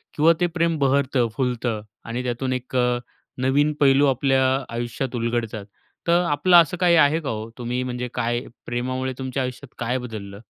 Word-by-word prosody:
किंवा 160 +3 +5
ते 175 - +3
प्रेम 170 -1 0
बहरतं, 135 -2 +2
फुलतं 120 -4 -1 0.2
आणि 120 +2 -3
त्यातून 125 +1 -2
1 125 0 -5
अ, 125 -1 +2 0.4
नवीन 140 +3 +3
पैलू 140 0 +5
आपल्या 135 0 +2 0.3
आयुष्यात 120 +2 -3
उलगडतात. 115 -3 -2 0.4
तर 170 +1 +4
आपलं 175 +5 +5
असं 170 +2 +4
काही 175 -1 +4
आहे 155 0 +5
का, 150 - -5
हो? 110 0 -4
तुम्ही 125 +1 -2
म्हणजे 125 0 -3
काय, 120 +1 0 0.3
प्रेमामुळे 130 +2 -2
तुमच्या 130 0 -2
आयुष्यात 125 +1 -7
काय 120 +2 0
बदललं? 105 -5 -7
130 Hz, 165 wpm, -23 LUFS, 120-140 Hz, 0.4 s, किंवा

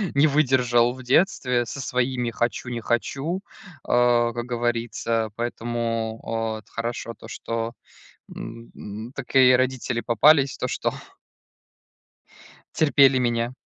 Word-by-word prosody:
не 140 +2 +5
выдержал 125 -5 +3
в 130 0 -11
детстве 125 -3 +2
со 140 +4 -6
своими 125 -1 -1
"хочу- 120 +1 -2
не 120 -1 -3
хочу", 135 - -2 0.4
а, 120 -1 +3
как 120 0 -4
говорится. 120 -2 -1
Поэтому, 115 -1 -3
о, 115 -1 -2
вот - - -28
хорошо 115 0 -4
то, 115 - -13
что, 115 0 -4 0.6
м, 115 0 -9
м, 110 +4 -8
такие 130 -1 +4
родители 125 -2 -1
попались, 135 +5 +4
то - - -1
что - - -1 1.8
Терпели 140 -3 +5
меня. 120 -1 0
120 Hz, 120 wpm, -24 LUFS, 115-130 Hz, 1.8 s, не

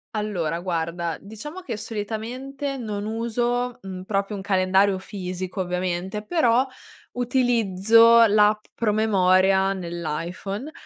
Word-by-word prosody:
Allora, 175 -7 -2
guarda, 170 -1 -2
diciamo 260 - -9
che 235 -11 -5
solitamente 235 +6 -5
non 210 -4 -4
uso, 240 +2 -1
mhmm, 190 -4 -7
proprio 200 +1 -1
un 195 - -5
calendario 190 0 +2
fisico 185 0 -5
ovviamente, 180 +2 -3
però 255 -6 +3 0.5
utilizzo 230 -2 +4
l'app 210 0 +3
promemoria 195 -3 +3
nell'iPhone, 175 - -5
205 Hz, 100 wpm, -24 LUFS, 185-230 Hz, 0.5 s, utilizzo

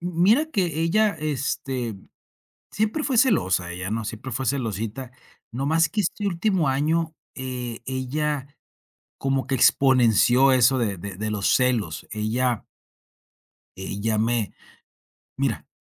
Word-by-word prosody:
Mira 185 - +2
que 175 - 0
ella, 205 +3 +2
este, 135 -5 -2 0.8
siempre 220 +9 -1
fue 260 -4 0
celosa, 95 - +2
ella 90 +2 -5
no 110 0 -2
siempre 120 +4 -6
fue 135 +2 -2
celosita, 115 0 -3 0.4
nomás 155 +6 +2
que 210 - 0
este 205 +3 -2
último 185 -3 +1
año, 160 +4 0 0.2
eh, 125 -3 -5
ella 135 +2 -2 0.7
como 135 -2 -1
que 135 - 0
exponenció 130 0 +4
eso 130 +1 +4
de 105 -6 -1
de 95 +2 -7
de 110 +1 -3
los 100 -2 +2
celos. 120 -11 0
Ella 115 +3 -1 1.1
ella 100 +3 -2
me 115 -1 0 0.9
mira, - - -2
130 Hz, 120 wpm, -24 LUFS, 115-160 Hz, 1.1 s, exponenció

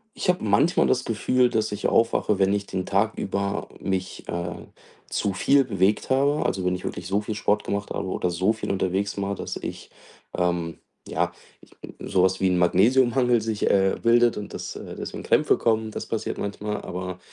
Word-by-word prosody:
Ich - - -4
habe 180 - +2
manchmal 110 - +3
das 130 0 +2
Gefühl, 125 +3 +2
dass 110 -1 0
ich 105 0 -1
aufwache, 115 -3 +2
wenn 95 0 +3
ich 100 0 -1
den 95 -2 -3
Tag 100 +3 +1
über 100 +1 -2
mich, 95 -1 -3
äh, 85 0 -5 0.4
zu 100 - -1
viel 140 +8 +4
bewegt 100 -4 +1
habe. 140 +3 +2
Also, 95 -1 -1
wenn 90 0 +1
ich 90 - -7
wirklich 90 - -5
so 100 +2 +1
viel 105 +1 -4
Sport 105 0 +1
gemacht 100 0 -3
habe 100 - -3
oder 90 -1 -1
so 95 +5 +1
viel 110 - -4
unterwegs 100 +1 -1
war, 100 0 -1
dass - - -5
ich, - - -7 0.5
ähm, 85 -2 -1 0.3
ja, - - 0 0.3
ich - - -20
bin, - - -11
sowas 95 0 +2
wie 95 - +3
'n 90 - +2
Magnesiummangel 120 +6 +3
sich, 110 -1 -1
äh, 95 -1 +3
bildet 120 0 +4
und 105 - -6
dass - - -5 0.2
deswegen - - -6
Krämpfe - - +3
kommen, 110 -1 +1
das - - -5
passiert - - -3
manchmal. 105 +1 -4
Aber, 90 0 -5
100 Hz, 190 wpm, -25 LUFS, 95-115 Hz, 0.5 s, viel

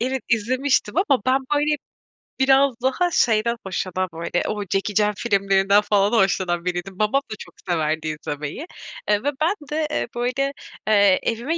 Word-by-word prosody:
Evet, 260 +2 -1
izlemiştim 255 +5 +1
ama 285 - +2
ben, 260 +1 +4 0.2
böyle, 300 +1 +2 0.6
biraz 270 0 +4
daha 345 +7 +1
şeyden 235 -2 +2
hoşlanan, 185 0 -2
böyle, 170 +2 -2
o 210 -1 -2
Jackie 195 +1 -2
Chan 210 0 +3
filmlerinden 200 -2 +3
falan 205 0 +2
hoşlanan 185 -5 +1
biriydim. 180 +2 -4
Babam 215 +6 +2
da - - -3
çok - - -11 0.2
severdi 160 -2 0
izlemeyi, 150 - -5 0.4
eee, 210 0 +2
ve 285 - +1
ben 345 +6 +2 0.2
de, 305 0 0
eee, - - -1
böyle, 250 +3 -1 0.3
eee, 200 -3 +5
evime 240 +9 -1
215 Hz, 155 wpm, -22 LUFS, 190-265 Hz, 0.6 s, eee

